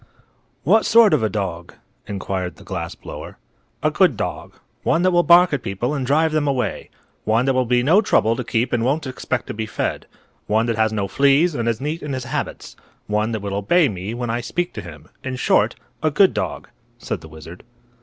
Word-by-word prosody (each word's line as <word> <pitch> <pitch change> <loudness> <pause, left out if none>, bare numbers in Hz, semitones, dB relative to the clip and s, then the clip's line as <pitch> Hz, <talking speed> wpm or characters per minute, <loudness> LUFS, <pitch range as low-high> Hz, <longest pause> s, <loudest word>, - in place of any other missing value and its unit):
"What 215 +8 +4
sort 225 -4 +6
of 150 - +3
a 110 - +1
dog?" 90 -4 -4 0.3
inquired 95 -2 -4
the - - -15
glass 85 -3 -5
blower. - - -9 0.5
"A - - +2
good - - +3
dog. - - -5 0.3
One 170 - +1
that 185 - +4
will 175 -1 +4
bark 175 0 +6
at 140 - 0
people 105 +8 -2
and 135 -4 -2
drive 155 +3 +3
them 155 -1 0
away. 130 -3 -2 0.3
One 115 +3 +2
that 135 - +2
will 130 -1 +1
be 120 0 +2
no 170 +10 +5
trouble 115 - +2
to 125 - -3
keep 120 +1 -1
and 120 -1 +1
won't 145 +5 0
expect 130 -1 -3
to - - -6
be 110 +1 -4
fed. - - -3 0.4
One 110 +2 +2
that 115 -1 0
has 110 0 +2
no 100 -2 -1
fleas 140 - +3
and 115 -4 -1
is 115 -1 -1
neat 150 +5 -3
in 145 -2 -4
his 130 -1 -3
habits. 145 +3 -5 0.3
One 105 +2 0
that 110 -2 -3
will 100 -1 -3
obey 135 - +3
me 100 +3 -5
when 120 -1 -3
I 120 +1 -1
speak 175 +8 -3
to - - -6
him. 80 -4 -12 0.2
In 130 -1 -3
short, 125 - +2 0.3
a 155 - +2
good 190 +6 +4
dog," - - -4 0.3
said 115 - -5
the 80 - -12
wizard. 80 +3 -11
120 Hz, 215 wpm, -21 LUFS, 105-150 Hz, 0.5 s, sort